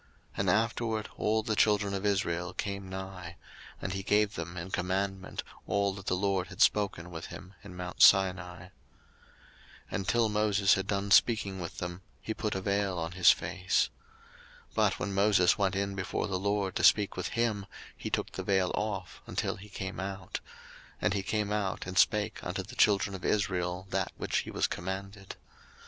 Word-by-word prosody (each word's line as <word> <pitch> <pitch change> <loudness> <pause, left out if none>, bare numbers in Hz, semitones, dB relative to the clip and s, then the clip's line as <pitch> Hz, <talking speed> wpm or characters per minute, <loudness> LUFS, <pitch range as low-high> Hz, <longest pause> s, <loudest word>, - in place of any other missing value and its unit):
02:034:032 - - -10
And 100 -2 +2
afterward 110 +1 0
all 110 +1 +1
the 110 0 -1
children 105 -2 +3
of 100 +1 -1
Israel 90 -3 0
came 100 -1 -4
nigh: 95 -2 -7 0.4
and 95 - -3
he 95 - -3
gave 105 +1 +2
them 85 +1 -6
in 90 +2 -6
commandment 95 +2 -2 0.2
all 100 -1 +1
that 100 0 -10
the - - +2
LORD 95 -1 0
had 95 - -12
spoken 100 -6 +2
with 80 0 -6
him 95 +2 -10
in 95 -3 -10
mount 90 0 -5
Sinai. 90 -3 +5
02:034:033 90 - -12 1.2
And 95 - -2
till 120 -1 +3
Moses 105 -2 +3
had 95 0 -1
done 100 0 -1
speaking 100 -4 +4
with 85 -1 -6
them, 90 +1 -5 0.2
he 110 - -4
put 105 -2 -2
a 95 - -2
vail 100 -1 0
on 85 0 -3
his 90 -1 +5
face. 95 0 +2 0.8
02:034:034 - - -29
But - - +2
when 100 - -2
Moses 100 -2 +4
went 95 -2 +1
in 100 0 -1
before 95 -2 -2
the 95 -2 -2
LORD 100 -1 0
to - - -2
speak 105 -2 +5
with 90 - -2
him, 110 -4 0 0.3
he - - -5
took - - -1
the - - -5
vail 95 -2 +2
off, 100 -3 -3
until - - -2
he 105 +2 -12
came 95 -1 -5
out. 95 -1 -4 0.6
And - - +1
he 100 - 0
came 105 +1 -1
out, 105 -3 -1
and 90 0 -6
spake 105 +4 +2
unto 90 +2 -3
the 120 +6 -11
children 100 -4 +3
of 95 - -8
Israel 90 -3 0
that - - -1
which - - -1
he - - -5
was - - 0
commanded. 95 +2 -5
95 Hz, 190 wpm, -30 LUFS, 90-105 Hz, 1.2 s, Sinai